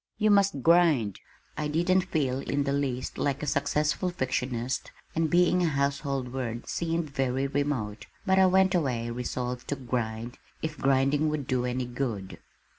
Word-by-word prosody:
You 215 0 +3
must 200 -9 +3
grind!" 160 - +4 0.4
I 150 - -2
didn't 180 +4 +2
feel 135 -6 0
in 140 +1 -1
the 140 0 -1
least 130 -3 -2
like 140 0 -1
a - - 0
successful 150 +4 0
fictionist 130 -5 -2 0.2
and 165 -1 +1
being 180 +1 +4
a 175 - +3
household 140 -3 -1
word 120 -3 -4
seemed 165 -2 -2
very 135 -1 0
remote, 140 -7 -2 0.2
but 190 -1 +4
I 190 - +7
went 190 +1 +4
away 125 -9 0
resolved 125 +1 -4
to 145 - -1
"grind" 120 -2 -3 0.2
if 160 -1 -2
grinding 135 +3 +2
would 150 -3 -2
do 125 -1 0
any 125 0 -1
good. 120 -6 -4
140 Hz, 160 wpm, -28 LUFS, 125-160 Hz, 0.4 s, I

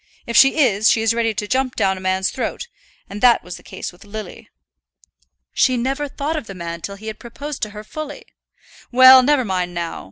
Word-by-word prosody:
If 235 - -5
she 270 +3 +6
is, 220 -8 +3
she 225 - +2
is 225 0 +2
ready 230 -1 0
to 210 - -3
jump 260 +2 -1
down 195 -3 +1
a 185 - -9
man's 190 0 0
throat; 480 - -4 0.4
and 205 +1 -8
that 245 -2 +5
was 180 +1 -8
the - - -16
case - - -7
with 175 - -18
Lily." 215 +1 -9 1.0
"She 255 -2 +2
never 270 +4 -2
thought 285 +3 -4
of 300 -8 -5
the 195 - -8
man 170 -1 -6
till 200 - -6
he 210 +2 -13
had 220 0 -6
proposed 280 +4 -8
to 215 - -2
her 210 +1 -10
fully." 295 +6 -8 0.7
"Well, 260 +1 +9
never 270 -1 +2
mind 180 -3 -2
now. 170 -1 -4
225 Hz, 215 wpm, -20 LUFS, 195-260 Hz, 1.0 s, Well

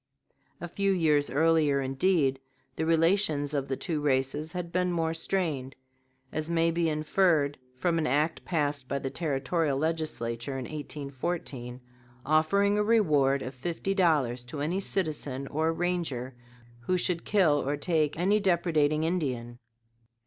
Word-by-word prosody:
A 175 - -5
few 195 +3 0
years 155 -6 +2
earlier, 155 -2 +3
indeed, 135 0 +1 0.4
the 160 - -2
relations 165 -3 +2
of 140 -2 -1
the 135 - -2
two 160 -5 -2
races 145 +2 0
had 175 -2 -4
been 180 0 +1
more 165 -2 0
strained, 160 -6 -2 0.6
as 155 +1 -3
may 165 0 +2
be 165 0 +1
inferred 155 -2 +1 0.2
from 165 +4 +1
an 155 - 0
act 150 +4 0
passed 145 -5 -1
by 140 - -1
the 135 -1 -4
territorial 150 -1 -1
Legislature 140 -5 -2
in 130 - -4
1814, 140 -3 -5 0.4
offering 200 +8 +3
a - - +3
reward 150 -12 +3
of 130 - -6
fifty 170 +8 -3
dollars 145 - +2
to 140 +4 -6
any 170 +6 0
citizen 150 -8 -2
or 160 +2 0
ranger 165 -8 -2 0.5
who 180 +10 0
should 175 -1 -1
kill 170 -8 +3
or 145 +2 -1
take 155 -1 0
any 195 +5 +3
depredating 160 -5 +2
Indian. 130 -9 -2
155 Hz, 140 wpm, -28 LUFS, 140-170 Hz, 0.6 s, earlier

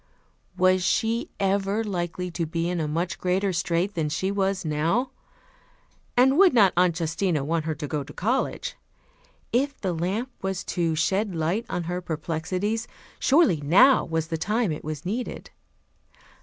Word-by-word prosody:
Was 185 0 +4
she 225 +5 0
ever 200 +2 +1
likely 180 -3 -3
to 170 -1 -2
be 165 +1 -2
in 175 -1 -1
a 155 - -1
much 170 +4 -2
greater 185 +2 0
strait 170 +3 0
than 160 -4 -1
she 190 +6 -1
was 195 -2 -1
now? 165 - 0 1.1
And 265 +5 +5
would 375 -8 +6
not 200 -5 +6
Aunt 175 -1 +3
Justina 165 -1 0
want 160 +2 -1
her 160 -1 -2
to 150 0 -5
go 150 -1 -2
to - - -12
college? 260 - -1 0.8
If 280 +4 +1
the 185 -3 -1
lamp 195 +10 -2
was 190 -1 -2
to 165 -2 0
shed 190 +5 0
light 170 +8 -1
on 175 - -2
her 175 +2 -3
perplexities, 180 +7 -2 0.3
surely 290 - +4
now 195 - +6
was 160 -1 -2
the 165 -2 -2
time 215 +1 0
it 150 - -5
was 155 +1 -5
needed. 230 +7 -4
180 Hz, 160 wpm, -25 LUFS, 165-205 Hz, 1.1 s, would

